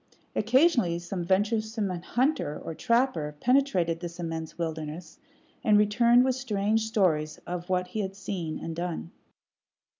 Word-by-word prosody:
Occasionally 240 - +3
some 175 +1 -4
venturesome 215 +3 0
hunter 185 - -1
or - - -4
trapper 230 - +1
penetrated 215 - +2
this 170 0 -7
immense 165 -2 -5
wilderness, 160 0 -5 0.4
and 210 -1 +5
returned 235 +4 +5
with 260 - +2
strange 220 -3 0
stories 160 -9 +1
of 175 +1 -5
what 180 -1 0
he 215 - -4
had 195 -2 -3
seen 185 -5 -4
and 165 - -5
done. 170 0 -4
190 Hz, 130 wpm, -28 LUFS, 170-225 Hz, 0.4 s, and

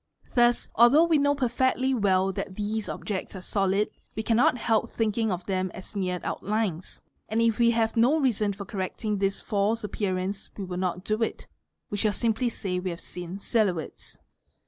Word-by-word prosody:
Thus 240 -1 +3
although 240 +8 +6
we 330 -3 +3
know 285 0 +3
perfectly 260 0 +1
well 195 -4 +2
that 185 - -5
these 210 +1 -2
objects 200 -1 -4
are 185 - -6
solid, 195 +2 +1 0.3
we 220 - -2
cannot 235 +2 +3
help 230 -1 +1
think 220 -2 -1
ing 220 -2 +1
of 180 -1 -3
them 185 -1 -1
as 190 - -10
mere 180 -2 -1
outlines; 205 -4 -2 0.3
and 220 +2 0
if 230 -1 +2
we 235 0 +5
have 230 0 +1
no 250 +7 +4
reason 220 -7 +1
for 200 0 -7
correcting 205 +1 -3
this 195 0 0
false 210 +2 0
appearance 195 -1 -2
we 200 - -4
will 180 -1 -5
not 180 -1 -2
do 215 +1 0
it, 225 - -2 0.5
we 205 - -2
shall 210 0 +1
simply 230 +3 +1
say 185 -5 -3
we 185 +1 -3
have 170 -1 -5
seen 180 +1 -7
silhouettes. 200 -6 -1
210 Hz, 185 wpm, -27 LUFS, 190-230 Hz, 0.5 s, although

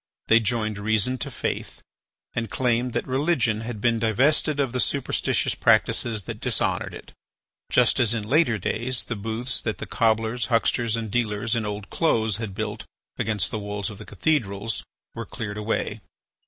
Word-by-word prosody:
They 115 - +7
joined 110 -2 -1
reason 110 +4 +1
to - - -3
faith, - - -4 0.5
and 115 -2 -2
claimed 125 -1 +1
that - - -1
religion 130 -5 +1
had 115 -1 -5
been 115 +1 +2
divested 140 +7 +2
of 135 -4 +1
the 125 - -1
superstitious 140 +1 +1
practices 110 -4 +3
that - - -6
dishonoured - - 0
it, - - -12 0.6
just - - +4
as 115 -1 +3
in 110 - -2
later 125 +1 +3
days 120 +6 -1
the 115 - -4
booths 110 +5 -3
that 110 - -2
the - - -5
cobblers, 115 +1 +1
hucksters, 115 -1 +2
and 110 -3 -3
dealers 110 0 0
in 110 -2 -1
old 105 -1 -5
clothes 110 - +2
had 110 -4 -5
built 105 0 -3 0.4
against 105 -4 0
the 110 - -2
walls 105 +1 -3
of 100 - -10
the 105 - -9
cathedrals 115 -8 -1 0.3
were - - -5
cleared 105 -2 -5
away. 105 0 -2
115 Hz, 165 wpm, -25 LUFS, 105-120 Hz, 0.6 s, They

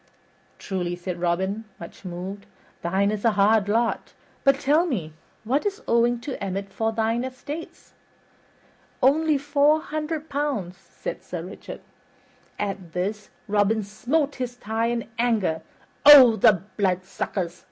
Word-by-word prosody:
"Truly," 175 -2 -3
said 175 0 -6
Robin, 190 +5 -1
much 170 - -11
moved, 185 +3 -6 0.3
"thine 190 +4 +1
is 210 -1 -4
a 230 -2 +3
hard 205 0 +4
lot. 230 +2 0 0.3
But 275 0 +4
tell 300 +5 +3
me, 175 - -3 0.3
what 260 +7 0
is 410 +2 -3
owing 235 +1 +3
to 265 -5 -5
Emmet 195 0 -4
for 225 0 0
thine 225 +2 0
estates?" 285 +5 -8 1.1
"Only 305 +3 +4
four 290 +2 +3
hundred 310 0 -4
pounds," 275 - -2
said 190 -3 -7
Sir 175 -2 -6
Richard. 185 +3 -9 0.8
At 195 -4 -4
this, 205 +4 -3 0.2
Robin 210 +1 +2
smote 275 +9 -1
his 250 -1 -4
thigh 225 0 -2
in 235 -1 -2
anger. 215 -9 +1 0.4
"O 270 -6 +10
the 190 -3 +4
bloodsuckers!" 185 -2 -2
220 Hz, 130 wpm, -24 LUFS, 190-270 Hz, 1.1 s, O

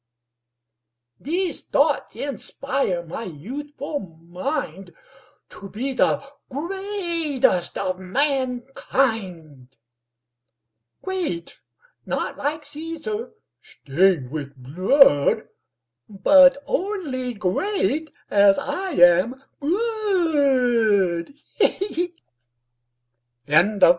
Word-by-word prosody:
These 345 +5 -2
thoughts - - 0
inspire 270 -6 -2
my 180 +8 -6
youthful 285 - -6
mind 180 - -6 0.5
To 195 - -10
be 260 +7 -3
the 270 - +1 0.2
greatest 335 - -1
of 185 -1 -2
mankind: 225 - -2 1.3
Great, 355 - -4 0.5
not - - -2
like 300 +2 -3
Cæsar, 330 +10 -5 0.3
stained 175 - 0
with 140 -2 -6
blood, 145 - +3 0.6
But 270 +7 +6
only 290 - -2
great 310 - -1 0.2
as 200 -1 +5
I 370 +6 -3
am 180 +10 +4 0.2
good. 280 - +1
260 Hz, 65 wpm, -23 LUFS, 185-310 Hz, 1.3 s, But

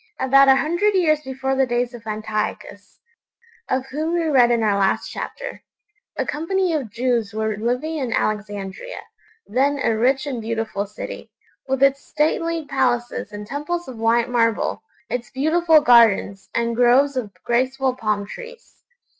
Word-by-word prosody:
About 275 +1 +5
a 270 - +7
hundred 345 +9 +1
years 310 -5 +3
before 265 -1 -3
the 265 0 +2
days 240 0 -1
of 230 -2 -11
Antiochus 215 0 -4 0.7
(of 260 0 0
whom 315 +5 -1
we 340 - +1
read 265 -7 +4
in 235 -2 +2
our 205 -2 +2
last 195 -1 +1
chapter) - - -6 0.6
a - - 0
company 350 +4 -1
of 280 -8 -2
Jews 230 -2 -1
were 220 -1 -1
living 250 +9 -2
in 260 -5 -3
Alexandria, 205 - -3 0.5
then 275 +5 +1
a 225 - +2
rich 260 +5 +2
and 260 -5 -4
beautiful 220 -2 -3
city, 210 - -8 0.4
with 265 0 0
its 275 0 +3
stately 320 +1 -1
palaces 245 -3 -1
and 210 0 -7
temples 320 +8 -4
of 250 -4 -9
white 230 +1 +2
marble, 230 - 0 0.3
its 245 -1 -4
beautiful 315 +3 +3
gardens, 225 -6 +4
and 235 0 0
groves 250 +4 +4
of 235 -6 -3
graceful 260 +2 0
palm 215 -4 -1
trees. 480 - -12
255 Hz, 155 wpm, -21 LUFS, 225-290 Hz, 0.7 s, a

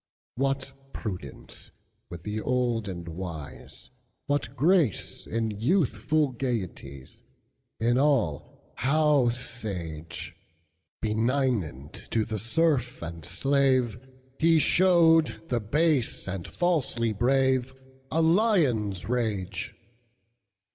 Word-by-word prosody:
What 135 +1 -1 0.2
prudence 90 - -7 0.4
with 85 -1 -9
the 105 +1 -3
old 120 -4 0
and 85 -3 -6
wise:What 85 - -6
grace 155 - +1
in 115 -1 -1
youthful 140 - +1
gayeties; 95 - -5 0.6
In 120 +3 +2
all 125 - 0
how 145 -1 +3
sage! 95 -10 -5 0.7
Benignant 110 - 0 0.2
to 110 -2 +1
the 110 -2 -4
serf 130 - 0
and 85 -1 -7
slave, 130 - +1 0.4
He 165 0 +5
showed 165 -4 +4
the 120 - +1
base 140 +2 0
and 95 -2 -4
falsely 135 -10 0
braveA 130 +2 +2 0.4
lion's 160 - +2
rage. 110 -6 -2
120 Hz, 85 wpm, -27 LUFS, 100-140 Hz, 0.7 s, He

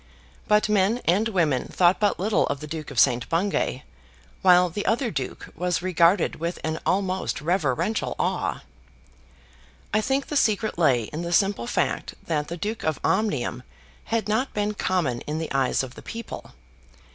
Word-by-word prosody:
But 210 +1 +4
men 210 +3 +2
and 195 +7 +3
women 160 - +1
thought 180 0 +3
but 205 -4 +1
little 210 +3 +2
of 140 - -2
the 150 - -7
Duke 155 0 -6
of 135 -5 -2
St. 125 -3 +3
Bungay, 165 -7 0 0.6
while 180 -1 +6
the 200 +4 -4
other 235 +1 +1
duke 135 -6 -5
was 180 +1 -1
regarded 180 0 +3
with 170 +2 -3
an 160 0 -2
almost 190 -1 0
reverential 170 - 0
awe. - - -1 1.3
I 215 - +3
think 270 +4 0
the 295 - -5
secret 215 -7 +1
lay 130 -8 +4
in 150 +9 -6
the 170 0 -4
simple 195 - +2
fact - - -1
that 150 -3 -1
the 170 - -5
Duke 210 +5 -4
of 155 -2 -1
Omnium 150 - 0 0.4
had 230 -1 -1
not 220 +6 0
been 210 0 0
common 170 - -1
in 150 +1 -2
the 160 0 -4
eyes 135 -1 +1
of 130 -2 -7
the - - -11
people. 230 -1 -8
180 Hz, 170 wpm, -25 LUFS, 155-210 Hz, 1.3 s, while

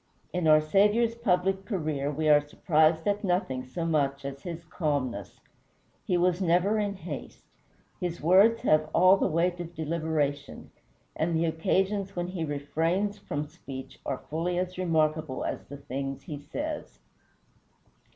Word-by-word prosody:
In 180 -2 0
our 155 0 +7
Saviour's 210 +8 +3
public 195 -4 +1
career 155 - -2
we 155 +2 -1
are 150 -1 +7
surprised 155 +2 +2
at 205 +1 0
nothing 180 -9 0
so 130 +7 -4
much 140 -4 0
as 140 0 -6
his 170 0 -7
calmness. 135 - -2 0.7
He 180 - +2
was 180 +1 +2
never 185 +5 +3
in 205 -1 -1
haste. 160 -6 -8 0.5
His 175 -1 -3
words 195 +8 +5
have 155 0 +3
all 185 +3 +7
the - - +1
weight 175 +2 +1
of 175 0 -7
deliberation, 155 -3 -2 0.4
and 165 +1 0
the 165 +1 +2
occasions 190 +5 0
when 175 0 -2
he 180 -3 -3
refrains 165 +8 -1
from 150 -6 -3
speech 140 -4 -10
are 135 - -4
fully 170 +3 -1
as 180 0 -2
remarkable 155 -5 0
as - - -4
the 140 - -9
things 135 0 -5
he 145 0 -6
says. 295 - -5
165 Hz, 150 wpm, -28 LUFS, 145-185 Hz, 0.7 s, our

